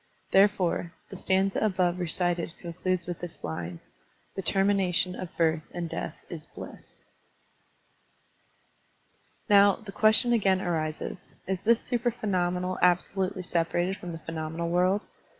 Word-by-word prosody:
Therefore, 190 -4 +3 0.2
the - - -6
stanza 190 +1 +1
above 185 -4 +1
recited 175 -1 -1
concludes 180 +1 -2
with 175 -2 -5
this 175 -2 -8
line: 85 +1 -4 0.5
"The 195 - -3
termination 195 -1 +2
of 185 -2 -8
birth 160 -1 +2
and 175 -1 -2
death 165 -1 -4
is 165 -2 -8
bliss.'* - - -11 2.4
Now, 200 -2 +6
the 215 -3 -10
question 220 +4 +5
again 195 -5 +3
arises. 160 0 -3 0.2
Is 190 -1 -2
this 230 +1 +3
supra 240 -1 0
phenomenal 180 -4 -1
absolutely 185 +1 +1
separated 175 +2 0
from 180 -3 -7
the 165 - -5
phe 165 - -8
nomenal 160 +1 -3
world? 185 +3 +3
180 Hz, 130 wpm, -28 LUFS, 170-195 Hz, 2.4 s, Now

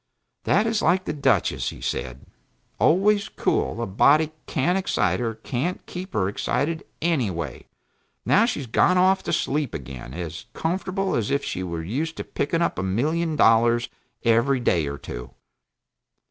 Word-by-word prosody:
"That 210 - +3
is 225 -1 0
like 185 +3 +2
the - - -2
Duchess," 135 - +1
said 60 +2 -4
he. - - -27 0.5
"Always 200 +5 +3
cool; 115 - -1
a - - -1
body 145 +10 +4 0.2
can't 170 +7 +1
excite 105 - +1
her 115 -2 -2
can't 130 +10 -3
keep 185 +1 -7
her 95 -3 +1
excited, 155 +10 -1 0.2
anyway. 115 - -1 0.6
Now 215 - +5
she 220 -11 -2
has - - -6
gone 180 +10 +3
off 190 +1 +4
to - - -4
sleep 145 -2 -1
again, 65 -3 -8
as 85 -3 -6
comfortably 185 - -1
as 110 - -2
if 140 0 0
she 95 - -3
were 85 -3 -4
used 145 - -3
to - - -3
picking 165 +4 -1
up - - -1
a - - 0
million 155 - 0
dollars 115 -1 +4 0.4
every 115 +4 +3
day 85 -10 +1
or 70 0 -4
two." - - -8
135 Hz, 160 wpm, -24 LUFS, -, 0.6 s, Now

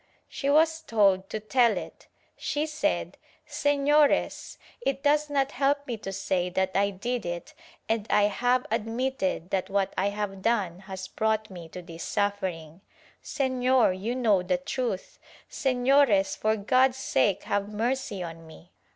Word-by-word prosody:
She 275 - -3
was 320 +2 +4
told 200 -8 +2
to 215 - -3
tell 230 -1 +2
it. - - -8 0.3
She 295 +1 -2
said 305 -1 -2 0.3
"Sefiores, 290 +1 +2 0.3
it 275 - -1
does 295 +1 +3
not 275 -1 +1
help 280 +2 +1
me 245 - -3
to 195 -2 -6
say 185 -2 -1
that 190 +1 0
I 200 +1 +2
did 235 +5 -3
it 175 -1 -5 0.3
and 225 -1 -1
I 210 - +4
have 245 +5 +1
admitted 225 -5 -2
that 190 0 -1
what 195 -1 0
I 195 +2 +1
have 200 -2 -4
done 195 -6 0
has 190 0 -6
brought 220 +1 -1
me 170 -3 -9
to 180 +2 -9
this 170 -1 -8
suffering 185 -5 -2 0.2
— - - -30
Sefior, 260 -3 +2
you 210 +7 -3
know 220 -7 +3
the 180 0 0
truth 225 +1 -4
— - - -24
Sefiores, 255 -5 +3
for 215 0 +1
God's 255 +5 +3
sake 195 - +1
have 200 0 -1
mercy 225 -3 -2
on 165 -1 -9
me. 170 +2 -15
215 Hz, 160 wpm, -27 LUFS, 190-260 Hz, 0.3 s, was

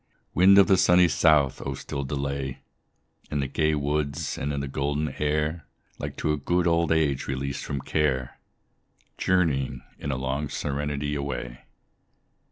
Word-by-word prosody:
Wind 95 +2 +6
of 100 - +8
the 95 - +4
sunny 90 0 +5
south! 75 -3 +3
oh 70 0 -3
still 70 +1 -5
delay 70 -1 -3 0.7
In 75 - -1
the 70 - 0
gay 75 +3 +1
woods 70 -1 -1
and 70 - -3
in 70 - -2
the 70 - -3
golden 75 +3 -1
air, 75 +1 -1 0.3
Like - - -5
to 75 - 0
a - - -1
good 85 +5 0
old 85 -1 +2
age 75 -4 +1
released 70 +1 -3
from 70 -1 -3
care, 65 -3 -1 0.8
Journeying, 70 -9 +1 0.2
in 70 - -4
long 65 +2 -2
serenity, 75 0 -2
away. 65 -4 -5
70 Hz, 150 wpm, -26 LUFS, 70-75 Hz, 0.8 s, of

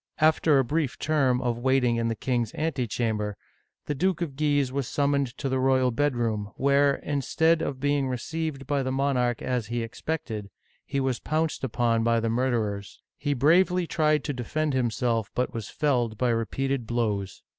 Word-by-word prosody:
After 155 -1 +4
a 135 - +4
brief 145 +1 -1
term 135 -5 +2
of 120 -1 -1
waiting 125 -2 +2
in 115 0 0
the 115 - -1
king's 120 -2 -1
antechamber, 115 -8 -1 0.5
the 150 - -1
Duke 180 +4 0
of 145 -5 -6
Guise 145 -3 +1
was 135 -2 -2
summoned 140 -3 0
to 140 - -3
the 130 0 0
royal 130 -1 +3
bedroom, 115 -6 0
where, 140 0 +3
instead 160 +3 +1
of 140 -5 -3
being 145 0 +1
received 140 +2 -3
by 140 +1 0
the 130 0 -2
monarch 130 -3 0
as 125 -4 -1
he 120 0 -2
expected, 115 -3 -4 0.4
he 140 - -1
was 130 -2 0
pounced 155 -1 -1
upon 115 -2 +1
by 115 0 +3
the 115 0 -1
murderers. 110 -5 -1 0.2
He 145 0 -1
bravely 175 +6 +4
tried 155 -2 +1
to 145 - -2
defend 150 +4 -2
himself, 115 -3 0
but 125 - -1
was 115 -3 -5
felled 120 -7 0
by 125 +1 +1
repeated 120 +2 -1
blows. 105 -5 -2
130 Hz, 170 wpm, -26 LUFS, 115-145 Hz, 0.5 s, After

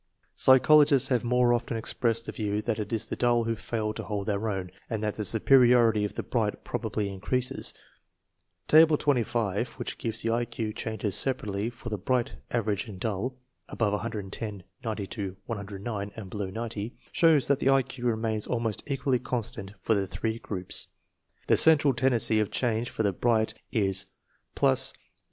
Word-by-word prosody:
Psychologists 140 +1 +6
have 125 -3 +1
more 125 0 +3
often 120 -1 -1
expressed 115 0 0
the - - -4
view 105 -1 -2
that 115 -2 -1
it 105 - -4
is 115 -2 -1
the - - -3
dull 120 -1 +2
who 115 0 -1
fail 110 -1 -3
to - - -5
hold 105 -2 -4
their 105 +1 -1
own, 95 -3 -3 0.2
and 110 -2 -3
that 105 -1 0
the 105 - -3
superiority 120 -1 +5
of 105 - -3
the - - -3
bright - - -1
probably 105 -2 -2
increases. 120 +6 -2 1.0
Table 155 0 +7
&5, 120 -6 0
which - - -5
gives 115 -1 -3
the 115 - +1
I 120 +1 +1
Q 110 -2 -4
changes 110 -3 -3
separately 105 -3 -1
for 120 0 -9
the 105 -3 -3
bright, 120 +5 0 0.2
average 105 -2 -1
and 100 -4 -9
dull 115 +5 -2 0.3
(above 105 -3 0
110, 105 -2 -4 0.2
90 100 -3 -4
109, 100 -1 -5
and 105 -4 -8
below 100 -3 -3
90), 110 +1 -5 0.2
shows 160 -5 +4
that 140 -1 +2
the 135 - +2
I 135 -1 +5
Q 125 -1 -5
remains 110 -2 -1
almost 115 -3 0
equally 135 -2 +1
constant 115 -4 -3
for 115 - +2
the 100 -2 0
three 110 +4 -3
groups. 95 -5 -5 0.6
The - - +4
central 150 -3 +6
tendency 120 -3 +3
of 105 - 0
change 120 -1 -1
for 110 - -2
the 100 -2 +1
bright 110 +2 +1 0.2
is 95 -3 0 0.2
+ - - -18
0. 65 - +5
115 Hz, 175 wpm, -28 LUFS, 105-120 Hz, 1.0 s, Table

